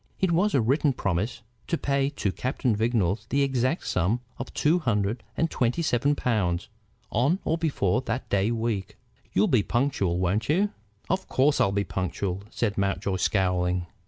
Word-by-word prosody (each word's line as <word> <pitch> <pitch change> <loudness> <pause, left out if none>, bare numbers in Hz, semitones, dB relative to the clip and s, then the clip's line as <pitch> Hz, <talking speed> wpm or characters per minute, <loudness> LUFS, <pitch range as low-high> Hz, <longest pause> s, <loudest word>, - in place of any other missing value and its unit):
It 190 -2 +2
was 190 +5 +2
a 135 - +4
written 135 +5 +2
promise 105 +3 -2 0.2
to 170 - 0
pay 140 -1 +1
to 125 -9 -2
Captain 125 +1 -1
Vignolles 110 -3 0
the 140 +2 +2
exact 130 +3 0
sum 95 +7 +1 0.2
of - - -5
two 160 +4 +3
hundred 110 - 0 0.2
and 165 0 +1
twenty 125 +7 0
seven 145 +1 +2
pounds 95 -10 0 0.4
on 140 - +2
or 160 - +2
before 140 - +1
that 120 0 -3
day 100 +2 +1
week. 115 -4 -2 0.4
"You'll 100 - +4
be 125 -5 +4
punctual, 110 -7 0
won't 95 +6 0
you?" 195 +7 +2 0.4
"Of 185 +1 -1
course 140 +3 +3
I'll 95 - +3
be 100 0 +1
punctual," 95 0 -3
said 105 -4 -1
Mountjoy, 100 -1 0
scowling. 90 -2 +1
115 Hz, 165 wpm, -26 LUFS, 100-140 Hz, 0.4 s, a